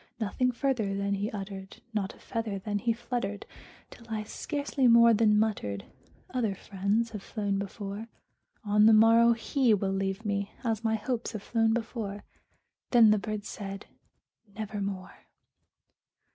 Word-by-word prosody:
Nothing 250 +4 0
further 235 -6 -1
then 200 0 0
he 200 +2 -1
uttered 195 -1 -7
not 205 -2 -2
a - - -20
feather 225 -4 -3
then 205 +1 -2
he 235 +2 +1
fluttered 230 -3 -3 0.5
Till 235 - -14
I 215 -1 -2
scarcely 285 +3 -1
more 235 0 +7
than 210 -1 +4
muttered, 200 - -1 0.5
"Other 225 -6 0
friends 205 +4 -1
have 210 -3 -6
flown 200 -2 -2
before 200 +2 -5 0.6
On 210 +1 +5
the 225 - +7
morrow 230 +2 +6
he 235 0 +2
will 195 -1 -1
leave 195 +2 -2
me, 200 -1 -2
as 225 -2 -1
my 220 -1 +2
hopes 235 +2 -3
have 215 -2 -5
flown 225 -1 +2
before." 225 -3 -3 0.7
Then 230 -3 +7
the 215 - +3
bird 210 0 -4
said, 195 -1 -6 0.7
"Nevermore." 200 -3 -5
215 Hz, 145 wpm, -29 LUFS, 200-230 Hz, 0.7 s, more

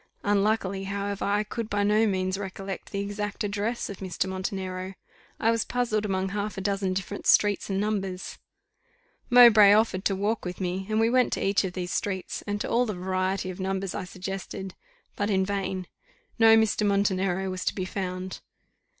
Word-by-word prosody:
Unluckily, 200 -1 +1
however, 200 0 -3
I 205 +1 +1
could 220 +1 -5
by 205 0 +1
no 210 +2 +3
means 185 -1 -1
recollect 195 0 -6
the 200 - -2
exact 205 +1 -4
address 210 +3 -2
of 200 - -7
Mr. 185 0 -2
Montenero. 190 0 -4 0.4
I 225 - +3
was 230 -1 +1
puzzled 235 -4 -1
among 190 -1 -1
half 205 +1 -3
a - - -3
dozen 195 -1 0
different 195 +2 -4
streets 205 -1 +4
and 195 0 0
numbers: 195 -3 -3 0.9
Mowbray 225 -5 +8
offered 210 -3 +2
to 195 - +2
walk 210 +3 -1
with 180 0 -5
me, 190 +1 -3
and 215 0 +1
we 225 +1 +3
went 255 0 +3
to - - -1
each 195 +1 +2
of 185 -2 -3
these 180 -1 -4
streets, 190 -3 -3
and 205 0 -2
to - - -2
all 245 +1 +2
the 210 - -3
variety 185 +1 -1
of 180 - -10
numbers 190 0 -2
I 190 - -4
suggested, 190 +1 -6 0.4
but 205 +1 -1
in 190 -2 +2
vain; 190 -2 -2 0.5
no 225 0 +7
Mr. 220 -1 +2
Montenero 195 -2 +1
was 185 0 -4
to - - 0
be 185 - -2
found. 185 -1 -4
195 Hz, 185 wpm, -27 LUFS, 190-210 Hz, 0.9 s, Mowbray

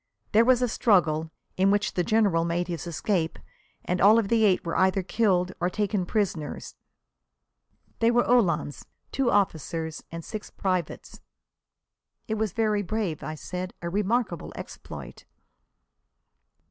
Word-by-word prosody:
There 220 +2 +6
was 250 0 +4
a - - +3
struggle, 165 -9 +2 0.3
in 190 +1 +4
which 205 -1 +1
the 180 - 0
General 200 -4 +2
made 170 +1 -1
his 170 -2 -5
escape 170 0 -1 0.5
and 180 0 -1
all 210 +3 +7
of 215 -4 +1
the 225 -2 +4
eight 185 -3 +2
were 170 - -2
either 190 0 +2
killed 185 -3 +1
or 175 - +1
taken 205 -2 -1
prisoners. 180 -9 -2 1.3
They 230 - +4
were 240 0 +3
uhlans, 170 - +1 0.2
two 270 -3 +1
officers 165 -5 -1
and 165 0 -7
six 215 -2 -6
privates." 185 -4 -3 1.1
"It 220 - -2
was 220 -2 -1
very 215 -2 +1
brave," 205 -5 -2
I 155 - -5
said. 180 +4 -6
"A 170 - -3
remarkable 205 -2 -1
exploit." - - -9
190 Hz, 140 wpm, -26 LUFS, 170-215 Hz, 1.3 s, all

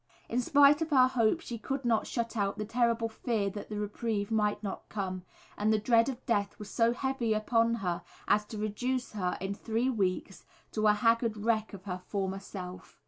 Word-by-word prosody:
In 245 +2 0
spite 285 +1 +5
of 320 - -1
her 260 -4 +6
hope, 250 +5 +2
she 235 -8 -6
could 270 +2 -3
not 230 -2 +2
shut 235 -1 -2
out 200 -2 0
the 215 - -3
terrible 230 0 +1
fear 220 -3 -1
that 205 - -7
the 210 - -4
reprieve 210 0 -2
might 210 -1 +1
not 200 - -5
come, 185 -3 -3 0.4
and 210 +1 +2
the 215 - +4
dread 230 +3 +3
of 260 -1 -6
death 205 -3 0
was 205 -1 -9
so 230 0 +3
heavy 245 -3 0
upon 230 +2 +2
her 175 -1 -1 0.3
as 210 +1 +4
to 215 - -8
reduce 245 +5 -2
her 185 -4 -2
in 195 +1 -2
three 230 +5 -1
weeks 190 -4 -2 0.3
to 215 -1 +1
a 210 - +6
haggard 230 +1 +2
wreck 220 0 0
of 190 - -12
her 180 -2 -5
former 195 -1 -2
self. 185 -2 -9
220 Hz, 200 wpm, -30 LUFS, 205-235 Hz, 0.4 s, her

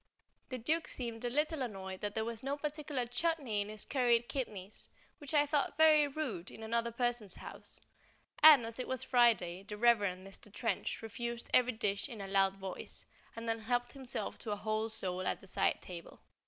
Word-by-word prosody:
The 255 - -3
Duke 310 +8 0
seemed 235 -2 -4
a 245 - 0
little 300 +3 +1
annoyed 190 -6 -5
that 205 0 -2
there 220 0 0
was 230 -1 -4
not 275 +2 -2
a - - -24
particular 295 -4 -2
chutney 245 -4 0
in 205 - -4
his 215 0 -4
curried 240 -3 +3
kidneys, 210 -7 -5 0.3
which 290 -3 -5
I 295 -2 +4
thought 290 -1 0
very 310 -2 +6
rude 270 - -4
in 220 - -10
another 230 +1 0
person's 240 -3 -1
house; - - -7 0.6
and, 300 -6 +10
as 230 +2 -7
it 255 - -3
was 260 -1 -1
Friday, 225 -8 +3
the 210 +1 -8
Reverend 205 -5 +3
Mr. 195 +1 -13
Trench 225 +1 -2
refused 235 +1 -5
every 255 0 +5
dish 205 +1 -1
in 230 -4 -8
a 195 - -5
loud 195 0 +3
voice, 190 -1 -7 0.3
and 230 0 -6
then 225 0 0
helped 245 +2 -1
himself 265 -3 -5
to 225 - -6
a 205 - 0
whole 215 +1 -1
sole 185 -5 -2
at - - 0
the - - -15
side 190 - 0
table. 175 -2 -9
235 Hz, 195 wpm, -34 LUFS, 205-260 Hz, 0.6 s, and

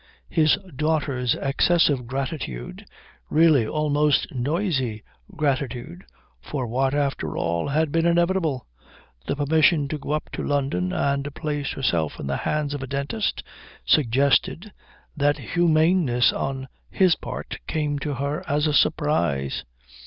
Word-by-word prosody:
His 155 -2 +4 0.2
daughter's 140 -5 0
excessive 140 -2 +2
gratitude, 130 - -5 0.4
really 155 -7 +4
almost 150 0 +1
noisy 135 - -1 0.3
gratitude, 140 +4 -2 0.4
for 135 -4 -4
what 130 +4 0
after 140 -2 -1
all 85 0 -1
had 150 +1 +1
been 165 +2 +2
inevitable, 170 -6 +1 0.6
the - - 0
permission 150 +1 +3
to 155 - -3
go 145 - -3
up 155 - -3
to - - -4
London 135 -11 0
and 140 +1 -1
place 145 -3 -3
herself 85 - -1
in - - -5
the 70 0 -1
hands 150 -1 -1
of 145 - -4
a 135 - -5
dentist, 140 - -2 0.4
suggested 140 - +2 0.4
that 145 -1 +2
humaneness 160 -6 +3
on 135 -1 -3 0.2
his 185 -3 +4
part - - -7
came 150 -2 -1
to 145 0 -3
her 140 +3 -2
as 150 0 +1
a 150 - +1
surprise. 85 - +1
145 Hz, 130 wpm, -24 LUFS, 130-155 Hz, 0.6 s, His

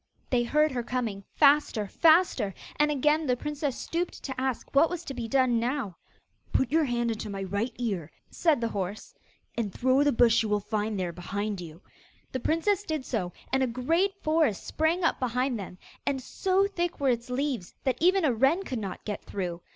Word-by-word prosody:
They 250 -2 +3
heard 300 +5 +2
her 250 -2 -1
coming, 230 -5 -3
faster, 285 -7 +4
faster; 315 - +3 0.2
and 300 0 +3
again 300 +2 +2
the 250 -1 +2
princess 295 -1 -3
stooped 345 +1 -3
to 260 -2 -4
ask 260 -2 -3
what 285 +4 +5
was 350 -1 -4
to 275 - -5
be 240 -3 -4
done 255 -1 +3
now. 240 -5 -2 0.6
'Put 265 - +1
your 320 0 +3
hand 240 -2 0
into 215 -1 -4
my 195 -1 -4
right 200 +6 -2
ear,' 200 -10 -2 0.2
said 315 -7 +2
the 230 - 0
horse, 200 0 -4 0.4
'and 225 -4 -2
throw 260 +6 +2
the 290 0 +4
brush 235 -2 +4
you 220 - -2
will 210 0 +2
find 210 0 -2
there 175 -2 -2
behind 200 +3 -3
you.' 165 0 -10 0.5
The 260 - -2
princess 330 - +1
did 310 -9 -3
so, 185 -7 -2 0.2
and 265 - +3
a 260 - +3
great 330 +12 +1
forest 310 -9 +2
sprang 325 +3 0
up 330 - +2
behind 250 -1 0
them, 185 -2 -8 0.3
and, 275 -1 0
so 380 +9 +1
thick 350 -4 -2
were 275 -2 +2
its 240 0 -1
leaves, 250 -7 -2
that 260 0 -1
even 365 +1 +4
a 265 - +3
wren 270 - +3
could 255 -9 -4
not 195 -4 -6
get 205 -1 -4
through. 180 -3 -4
255 Hz, 195 wpm, -28 LUFS, 215-300 Hz, 0.6 s, what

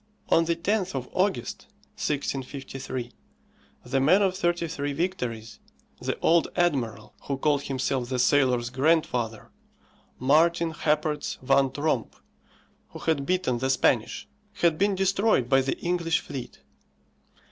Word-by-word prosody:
On 165 - +4
the 170 0 +1
10th 190 0 -1
of 125 -1 -3
August, 185 - -1 0.3
1653, 135 -3 -4 0.7
the 135 +2 0
man 180 +10 +4
of 190 -1 +1
thirty 175 -2 0
three 145 -2 -3
victories, 125 -10 -3 0.4
the - - -2
old 170 0 +4
admiral 140 -11 -1
who 140 - -2
called 145 0 +1
himself 130 -2 -2
the 130 - -1
sailors' 125 -2 +2
grandfather, 130 -6 0 0.7
Martin 165 +5 +3
Happertz 150 -1 -1
van 135 0 +3
Tromp, 145 -3 -1 0.7
who - - -10
had 140 -4 -1
beaten 180 -10 0
the 130 +1 -1
Spanish, 130 -3 +1 0.3
had 165 -2 +1
been 200 0 +2
destroyed 195 - +2
by 135 +1 +4
the 135 - -2
English 170 -2 0
fleet. 130 -3 -8
145 Hz, 125 wpm, -26 LUFS, 130-170 Hz, 0.7 s, On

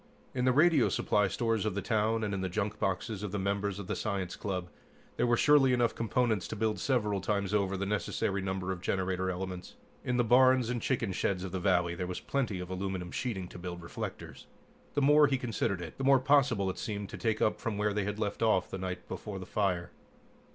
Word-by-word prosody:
In 125 -1 0
the 130 - +5
radio 150 -1 +4
supply 105 -1 +2
stores 115 +1 0
of 105 -3 -1
the 100 - -1
town, 110 0 +1
and 105 -2 -1
in 95 - -2
the 95 - -2
junk 105 +3 -2
boxes 95 +2 -2
of 105 -3 -4
the 105 - -2
members 100 0 -1
of 100 - -6
the - - -2
science 95 -4 -2
club, 95 -3 -3 0.5
there - - +1
were 120 0 +3
surely 145 -3 +5
enough 120 -2 +2
components 115 -3 0
to - - -5
build 110 0 0
several 105 -7 0
times 100 0 -1
over 100 -2 +1
the 100 - -2
necessary 100 0 -1
number 95 -1 -2
of 90 -2 -5
generator 95 0 -1
elements. 90 0 -5 0.3
In 125 - 0
the 120 - +4
barns 125 0 +5
and 120 -2 -2
chicken 120 -6 0
sheds 90 0 -1
of 95 - -5
the 95 - -2
valley 90 -2 +2
there 90 +1 -4
was 90 - -4
plenty 125 -9 -2
of 90 0 -6
aluminum 95 -1 -3
sheeting 100 -8 -3
to - - -10
build 90 -1 -6
reflectors. 85 - -7 0.5
The 145 - +2
more 150 +1 +6
he 135 -1 +1
considered 110 -6 -2
it, 80 - -9
the - - -2
more 135 0 +6
possible 125 -8 +3
it - - -10
seemed 100 -2 -4
to - - -7
take 110 -3 0
up 105 - +1
from 115 -4 -2
where 105 0 +1
they 105 -1 -1
had 105 +1 -3
left 105 0 -3
off 110 -5 +2
the 95 - -4
night 90 -1 -5
before 95 +2 -6
the 95 - -7
fire. 90 -4 -1
100 Hz, 230 wpm, -31 LUFS, 95-115 Hz, 0.5 s, more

